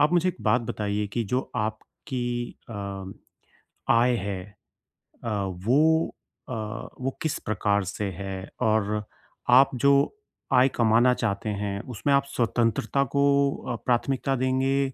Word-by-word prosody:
आप 150 +4 +4
मुझे 175 +1 +3
एक - - -3
बात 125 - +3
बताइए 105 0 -1
कि 115 +4 -2
जो 130 - +3 0.2
आपकी 110 +4 -4 0.5
अम, 100 -2 -6 0.8
आय 120 +1 +4
है 95 -1 -3 0.8
अ, 115 - -2 0.4
वो 160 +6 +4 0.4
अ, - - -3 0.5
वो 135 +1 -2
किस 160 - -1
प्रकार 100 -1 +1
से 100 +2 -4
है 95 -1 -4 0.3
और 105 -2 +1 0.6
आप 135 - +5
जो 140 +3 +4 0.6
आय 125 +1 +6
कमाना 120 +2 +4
चाहते 110 -2 -2
हैं 100 -1 -2 0.2
उसमें 140 +7 +1
आप 140 0 +4
स्वतंत्रता 115 +2 +1
को 140 - +4 0.5
अ, - - -2
प्राथमिकता 135 +2 +1
देंगे 130 +1 +1
120 Hz, 135 wpm, -26 LUFS, 105-135 Hz, 0.8 s, आय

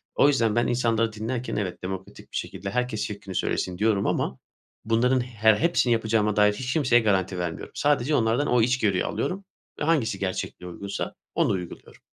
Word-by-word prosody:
O - - +5
yüzden 115 -7 +2
ben 120 - +2
insanları 115 -2 +1
dinlerken, 115 +4 -3
evet, 95 -3 -3
demokratik 95 0 -7
bir - - -3
şekilde 95 +1 -5
herkes 125 -3 -1
fikrini 100 -3 -7
söylesin 90 -1 -1
diyorum 105 -1 +2
ama 65 - -1 0.5
bunların 125 +3 +3
her 110 -3 +3
hepsini 145 -4 +2
yapacağıma 110 -2 +1
dair 105 0 +4
hiç 130 +4 -3
kimseye 125 -7 +4
garanti 95 -4 +1
vermiyorum. 85 -2 -4
Sadece 145 0 +2
onlardan 115 +4 +2
o 120 -2 +3
içgörüyü 110 -6 +2
alıyorum 190 +2 -3 0.3
ve - - -2
hangisi 140 -11 +1
gerçekle 95 -1 -4
uygunsa 100 +3 -5 0.2
onu - - +2
uyguluyorum. 90 -3 -6
110 Hz, 170 wpm, -25 LUFS, 100-125 Hz, 0.5 s, O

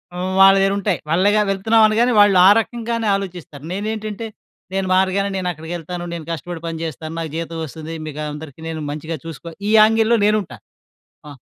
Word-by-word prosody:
హ్మ్. 185 +1 -3
వాళ్ళ 195 0 +8
దగ్గరుంటాయి. 195 -3 0
వాళ్ళేగా 200 +6 +3
వెళ్తున్నామనగానే 220 +4 +3
వాళ్ళా 195 -3 +6 0.2
రకంగానే 230 -1 -4
ఆలోచిస్తారు. 175 -7 -7
నేనేంటంటే 215 +1 -4 0.5
నేను 195 -1 -1
మారగానే 190 +1 +1
నేను 185 - -3
అక్కడికేళ్తాను, 175 +2 -6
నేను 170 -2 -6
కష్టపడి 165 +1 -6
పని 165 0 -4
చేస్తాను, 160 0 -6
నాకు 165 -1 -4
జీతం 165 0 -4
వస్తది, 160 +2 -8
మీకు 155 -1 -7
అందరికి 150 0 -10
నేను 160 -1 -4
మంచిగా 155 +2 -5
చూసుకో 165 +1 -8 0.2
ఈ - - +1
యాంగిల్‌లో 225 +2 +4
నేనుంటా. 210 - 0 0.7
ఆ! - - -9
185 Hz, 150 wpm, -20 LUFS, 165-210 Hz, 0.7 s, వాళ్ళ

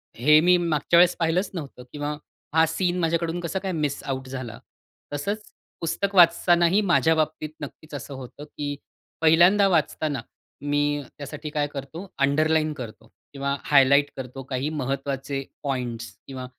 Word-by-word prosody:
हे 150 +6 +6
मी 180 +2 +5
मागच्या 170 -1 +1
वेळेस 180 0 +5
पाहिलंच 170 +4 +1
नव्हतं." 145 -7 -7
किंवा 145 0 -3 0.4
"हा 160 0 +6
सीन 180 +2 -1
माझ्याकडून 170 0 0
कसं 175 +2 -3
काय 190 - -2
मिस 150 -4 -2
आउट 130 -1 -4
झाला?" 130 -4 -6 0.5
तसंच 200 +9 -3 0.4
पुस्तक 195 +4 -2
वाचतानाही 175 +2 +5
माझ्या 170 -4 +3
बाबतीत 155 -1 -1
नक्कीच 150 +2 -9
असं 140 0 -6
होतं 130 +2 -10
की 145 -1 -5 0.5
पहिल्यांदा 175 +5 +6
वाचताना 155 -5 0 0.4
मी 145 0 +1 0.2
त्यासाठी 150 +2 -7
काय 150 -1 -1
करतो, 145 +6 -8
अंडरलाईन 155 +2 +2
करतो. 115 -4 -9 0.3
किंवा 140 0 -1
हायलाइट 140 0 +5
करतो 130 0 -7
काही 130 +3 -1
महत्वाचे 135 -1 -3 0.2
पॉइंट्स 120 -5 -4
किंवा 130 -2 -6
150 Hz, 140 wpm, -25 LUFS, 140-170 Hz, 0.5 s, हे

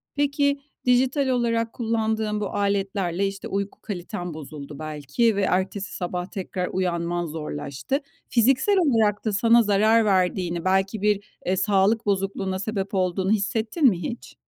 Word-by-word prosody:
Peki 285 0 +1 0.3
dijital 260 +3 +3
olarak 230 -2 0
kullandığın 220 -2 -1
bu 205 - -1
aletlerle, 195 -2 0
işte, 195 0 -6
uyku 200 +1 -3
kaliten 175 -3 -5
bozuldu 150 -1 -9
belki 155 - 0
ve 200 - 0
ertesi 190 +1 -1
sabah 180 -1 -3
tekrar 185 -3 -4
uyanman 175 -1 -1
zorlaştı. 150 - -4 0.3
Fiziksel 265 - +3
olarak 225 - +2
da 215 - 0
sana 230 +3 +5
zarar 215 +2 +4
verdiğini, 180 -3 +1
belki 190 +2 +1
bir, 205 -1 0
eee, 185 +1 +1
sağlık 200 +3 +2
bozukluğuna 195 -1 -1
sebep 200 -1 -3
olduğunu 185 +1 0
hissettin 220 - 0
mi 190 -9 +4
hiç? 230 +9 -6
200 Hz, 135 wpm, -24 LUFS, 180-225 Hz, 0.3 s, sana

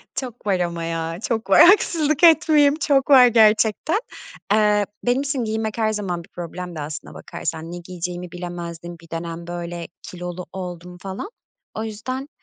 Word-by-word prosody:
Çok 245 -4 -6
var 190 -2 +2
ama 170 -1 -2
ya, 165 0 -3
çok 225 -3 -2
var! 195 - +8
Haksızlık 315 -6 +2
etmeyeyim, 310 -3 +6
çok 280 -4 +1
var 260 -3 +9
gerçekten. 220 - +3 0.5
Eee, 210 -1 +3 0.2
benim 245 +2 +2
için 280 -3 -2
giyinmek 220 0 -2
her 220 -1 +1
zaman 180 -5 -3
bir - - -20
problemdi 175 -1 -7
aslına 150 +1 -6
bakarsan. 165 0 -6
Ne 175 - -6
giyeceğimi 175 0 -6
bilemezdim, 175 -1 -7
bir 165 - -17
dönem, 165 +1 -6
böyle, 175 -1 -5
kilolu 180 0 -7
oldum 180 -1 -7
falan. 195 - -6 0.4
O 220 - -4
yüzden, 255 +6 -5
190 Hz, 155 wpm, -22 LUFS, 175-245 Hz, 0.5 s, var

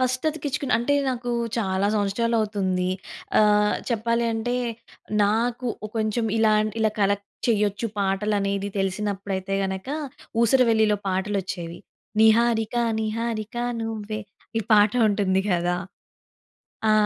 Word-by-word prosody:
First 255 +1 0
అతికిచ్చుకుని 290 -3 -2
అంటే 240 +5 +1
నాకు 245 -1 -2 0.3
చాలా 195 -2 0
సంవత్సరాలవుతుంది. 205 -3 0 0.5
ఆహ్, 210 0 +4 0.2
చెప్పాలి 230 +1 +1
అంటే, 225 +2 -1 0.7
నాకు 235 +4 0 0.2
ఒ - - -11
కొంచెం 220 +1 0
ఇలాంటి 215 -1 +3
ఇలా 220 -1 +3
కలెక్ట్ 200 0 +1 0.2
చేయొచ్చు. 210 -1 +1
పాటలు 200 +2 0
అనేది 200 0 -1
తెలిసినప్పుడైతే 195 0 -2
గనక 190 +4 -4 0.5
'ఊసరవెల్లిలో' 225 -4 +4
పాటలొచ్చేవి. 190 -3 -2 0.4
'నిహారిక, 225 0 +4 0.3
నిహారిక 220 0 -3 0.3
నువ్వే' 215 -1 -4 0.4
ఈ - - 0
పాట 210 0 +6 0.2
ఉంటుంది 195 -2 +1
కదా! 175 0 +1 1.1
ఆ! - - +5
215 Hz, 105 wpm, -24 LUFS, 195-230 Hz, 1.1 s, పాట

